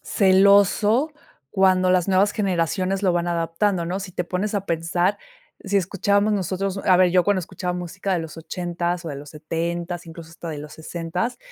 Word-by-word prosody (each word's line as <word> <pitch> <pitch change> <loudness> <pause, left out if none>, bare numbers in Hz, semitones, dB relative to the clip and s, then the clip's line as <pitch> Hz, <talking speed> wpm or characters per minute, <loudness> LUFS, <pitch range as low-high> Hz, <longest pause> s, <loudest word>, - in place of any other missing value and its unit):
celoso 200 - +4 0.4
cuando 185 -1 +3
las 180 -1 +3
nuevas 195 +2 +4
generaciones, 185 -1 0
lo 185 -3 +3
van 175 0 0
adaptando, 170 +2 0
¿no? 180 +3 -2
Si 190 -2 -7
te 180 - -2
pones 190 +4 -2
a 200 -1 -2
pensar, 165 +2 0 0.4
si 200 0 -1
escuchábamos 200 +3 +1
nosotros 195 0 -2
A 185 - +6
ver, 180 -1 +4
yo 180 0 +4
cuando 205 -2 +2
escuchaba 180 +1 -4
música 185 +2 -3
de - - 0
los 160 0 -8
80 175 +1 -3
o 165 - -4
de 145 - -5
los 145 +1 -10
70, 170 +2 -4
incluso 165 0 -10
hasta 165 +1 -9
de 150 -2 -5
los 150 +1 -9
60 170 +7 -4
180 Hz, 180 wpm, -23 LUFS, 170-195 Hz, 0.4 s, A